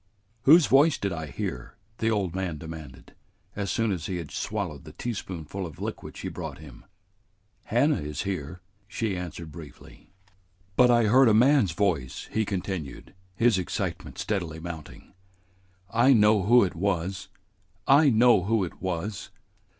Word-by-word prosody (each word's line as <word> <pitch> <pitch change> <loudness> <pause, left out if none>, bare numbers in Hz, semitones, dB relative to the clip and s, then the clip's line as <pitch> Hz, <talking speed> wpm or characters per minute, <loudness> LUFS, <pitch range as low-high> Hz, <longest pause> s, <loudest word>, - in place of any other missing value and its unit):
"Whose 160 +3 +8
voice 145 +4 +4
did 100 -2 -2
I 80 -2 -5
hear?" - - -5 0.2
the 110 - +1
old 100 -6 0
man 95 -4 -3
demanded, 80 -4 -10 0.4
as 100 -2 -3
soon 115 +2 0
as 90 -4 -3
he 95 - -3
had 85 -4 -7
swallowed 95 -10 -4
the - - -12
teaspoonful 95 -6 -5
of 85 -1 -8
liquid 110 +2 -6
she - - -5
brought - - -6
him. 75 -6 -13 0.8
"Hannah 140 +7 +2
is 75 -1 -4
here," 90 -3 -5 0.3
she 105 0 -2
answered 85 -2 -7
briefly. 75 -1 -13 0.7
"But 125 0 +5
I 120 -1 +5
heard 125 +5 +5
a 105 - +4
man's 125 - +4
voice," 80 -10 -1
he 110 0 0
continued, 95 -7 -5 0.2
his 115 -2 +3
excitement 90 - -4
steadily 85 -7 -3
mounting. 80 -6 -9 0.7
"I 120 +6 +4
know 105 -4 +4
who 120 +2 +6
it 95 - -1
was! 95 +1 -2 0.6
I 145 +2 +6
know 115 -5 +4
who 110 -1 +1
it 90 - -7
was!" 95 +2 -4
95 Hz, 150 wpm, -26 LUFS, 80-110 Hz, 0.8 s, Whose